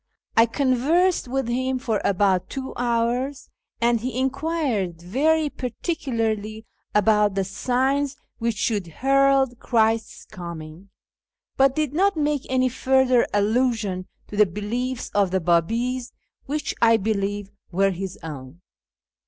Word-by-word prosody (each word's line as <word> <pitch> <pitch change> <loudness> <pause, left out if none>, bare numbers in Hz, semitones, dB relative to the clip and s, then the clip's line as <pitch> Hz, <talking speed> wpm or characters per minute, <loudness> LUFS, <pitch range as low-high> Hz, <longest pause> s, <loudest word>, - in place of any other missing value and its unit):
I 230 +1 +6
conversed 280 +8 +2
with 265 0 -1
him 255 +2 0
for 225 -4 -1
about 190 -2 +2
two 265 -1 -5
hours, 245 +3 -1 0.3
and 235 0 +2
he 250 +2 -4
enquired 265 - -1
very 295 - +1
particularly 225 - -3 0.3
about 210 -1 +3
the 195 - +1
signs 260 +8 0 0.2
which 230 -1 0
should 205 -4 -1
herald 270 - +2
Christ's 225 -1 0
coming, 170 -1 -9 0.7
but 270 0 +4
did 305 -3 -1
not 390 +2 +2
make 295 -2 0
any 255 0 +2
further 255 -1 +3
allusion 210 -3 0 0.2
to - - -7
the 210 0 +5
beliefs 230 +7 -3
of 200 -2 +3
the 190 +1 +1
Biibis, 230 +10 0 0.3
which, 295 +2 -2
I 230 -1 +6
believe, 205 -1 -2 0.2
were 195 +2 +2
his 190 0 -5
own. 145 0 -8
235 Hz, 125 wpm, -23 LUFS, 200-265 Hz, 0.7 s, I